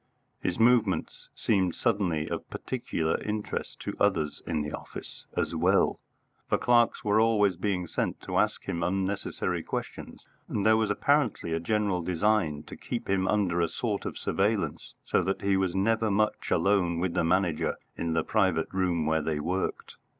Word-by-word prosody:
His 90 - -1
movements 120 0 +2
seemed 95 -5 +1
suddenly 95 -10 0
of - - -5
particular 80 -10 -2
interest 105 0 -4
to - - -4
others 85 -7 +1
in 80 -3 0
the 75 - -5
office - - -8
as - - 0
well, 90 +4 +3 0.5
for - - +3
clerks 120 -1 +3
were 105 +1 +3
always 105 -4 +3
being 90 -1 -1
sent - - -2
to - - -1
ask - - +1
him 85 - -3
unnecessary 95 +3 -1
questions, - - -6 0.2
and 100 - -1
there 110 0 +6
was 110 -1 +1
apparently 120 - +1
a 80 - 0
general 100 0 0
design 85 -4 +1
to - - -10
keep 120 -1 -5
him 95 -1 +1
under 95 -5 +1
a 85 - +2
sort - - -3
of - - -5
surveillance, 100 +1 -1
so - - +2
that 95 - -2
he 100 -1 +3
was 95 -2 0
never 110 +3 +2
much 105 +1 0
alone 95 -4 +2
with 85 0 -1
the - - +1
Manager 85 -1 +1 0.2
in 85 -1 -2
the 80 -1 +1
private 95 -8 +1
room 90 -4 +1
where 80 0 +2
they 75 0 -1
worked. 90 +5 -3
95 Hz, 170 wpm, -28 LUFS, 85-105 Hz, 0.5 s, there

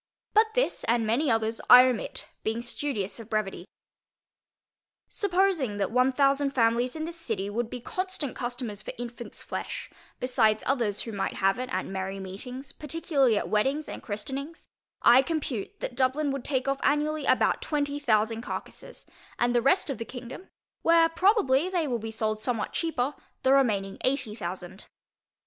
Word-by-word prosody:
But 440 +1 +4
this, - - +1
and 235 -1 +2
many 250 +7 +1
others, 225 0 +1
I 250 +1 +11
omit, 250 -4 -2 0.2
being 225 +2 -1
studious 235 -6 -3
of 225 -1 -10
brevity. 205 -4 -2 1.4
Supposing 360 - +1
that 200 +1 -1
one 250 +2 +3
thousand 275 +1 +2
families 240 +2 +2
in 315 0 -3
this 335 0 -6
city, 205 - -2
would 230 +2 -2
be 245 - -5
constant 370 0 -3
customers 240 -4 -4
for - - -7
infants 240 0 -8
flesh, - - -5 0.3
besides 225 -4 +2
others 235 -7 0
who 230 - -6
might 200 -2 -2
have 195 +3 +2
it 255 0 -4
at - - -1
merry 195 0 -4
meetings, 250 +8 -7
particularly 290 -6 +1
at - - -1
weddings 270 +9 +1
and - - -7
christenings, 270 +9 -6 0.4
I 245 +2 +8
compute 275 -7 -3
that - - -3
Dublin 265 +3 +1
would 275 -2 -4
take 265 -2 0
off 275 0 0
annually 300 +1 +1
about - - +3
twenty 290 -1 -1
thousand 225 -4 +1
carcasses; - - -7 0.3
and 240 0 +2
the 240 - +3
rest 285 +5 +3
of 260 - -5
the - - -2
kingdom 250 +9 -9 0.3
(where 330 0 +5
probably 340 - +3
they 350 -5 0
will 240 -3 -1
be 225 +1 -5
sold 215 -1 -1
somewhat 230 -1 -2
cheaper) 295 -5 -1 0.3
the 265 - +5
remaining 205 -8 +2
eighty 260 -4 0
thousand. 185 -2 -7
250 Hz, 165 wpm, -27 LUFS, 220-290 Hz, 1.4 s, I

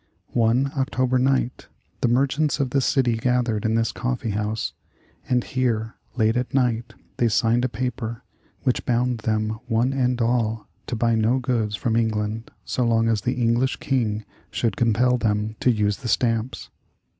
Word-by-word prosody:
One 120 +4 +2
October 130 -2 +1
night 130 -1 0 0.3
the - - +3
merchants 140 +5 +1
of 135 -3 0
the 140 - +2
city 125 -4 +2
gathered 120 -3 0
in 110 0 +2
this 115 0 +1
coffee 120 -2 -2
house, 105 +2 -2 0.6
and 125 -1 +2
here, 115 -4 -1 0.2
late 110 -1 +2
at 125 +2 -2
night, 120 -3 0 0.2
they 120 - +3
signed 115 +1 +2
a - - 0
paper 120 0 -4 0.4
which 125 -3 +1
bound 125 0 +1
them 110 0 -1
one 120 +3 +1
and 125 -2 +1
all 115 -2 0 0.2
to - - -2
buy 115 +1 +2
no 110 +3 +2
goods 120 -5 0
from 110 +2 -1
England 110 -1 -1 0.2
so 125 - -1
long 115 -1 +2
as 110 -2 +1
the 125 +4 -1
English 120 +2 +2
King 110 -6 -1 0.2
should 115 - -1
compel 120 +2 +2
them 105 -1 0
to - - +2
use 105 -3 +1
the 125 - -7
stamps. 115 +1 0
120 Hz, 165 wpm, -24 LUFS, 110-125 Hz, 0.6 s, the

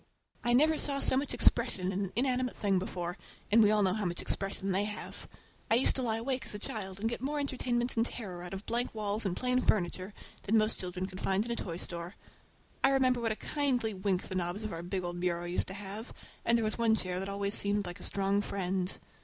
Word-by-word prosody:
I 240 - +3
never 310 +5 +4
saw 280 -1 +1
so 260 - +5
much 275 +2 0
expression 185 0 +4
in 195 +1 -1
an 185 - -7
inanimate 255 0 +1
thing 195 -3 +2
before, 175 -1 -4 0.3
and 225 +2 +7
we 210 - +6
all 210 -1 +4
know 185 -1 +3
how 215 -2 -1
much 175 -1 -2
expression 195 0 -1
they 195 +2 +2
have! 210 0 -6 0.4
I 225 - +5
used 250 - +4
to - - 0
lie 225 -3 0
awake 260 +3 -2
as - - -3
a - - -2
child 195 -2 -4
and 220 - 0
get 235 - -3
more 290 +3 -1
entertainment 250 -3 0
and 225 - +3
terror 195 -7 -5
out 180 - -7
of 195 - -8
blank 235 0 -1
walls 210 0 -1
and 180 - -2
plain 250 0 +2
furniture 185 -1 0 0.3
than 220 +3 +2
most 215 +1 +2
children 180 0 -3
could 185 0 -8
find 195 +3 +1
in 240 - -4
a - - 0
toy 170 -7 -4
store. 175 +2 -5 0.7
I 270 - +7
remember 255 -2 +3
what 225 -1 +1
a - - -1
kindly 250 -5 0
wink 190 -1 0
the - - -4
knobs 180 +3 -2
of 215 - -4
our 165 - -4
big 185 +2 -3
old 175 0 -4
bureau 175 -1 0
used 175 +1 -1
to 190 - -5
have, 205 +3 -7 0.3
and 235 0 +4
there 225 - 0
was 215 - -2
one 225 -1 +4
chair 185 -3 0
that 195 +1 -3
always 200 0 -2
seemed 205 -1 +1
like 175 -1 -6
a - - -9
strong 200 +1 +1
friend. 185 -2 -2
205 Hz, 245 wpm, -32 LUFS, 185-235 Hz, 0.7 s, and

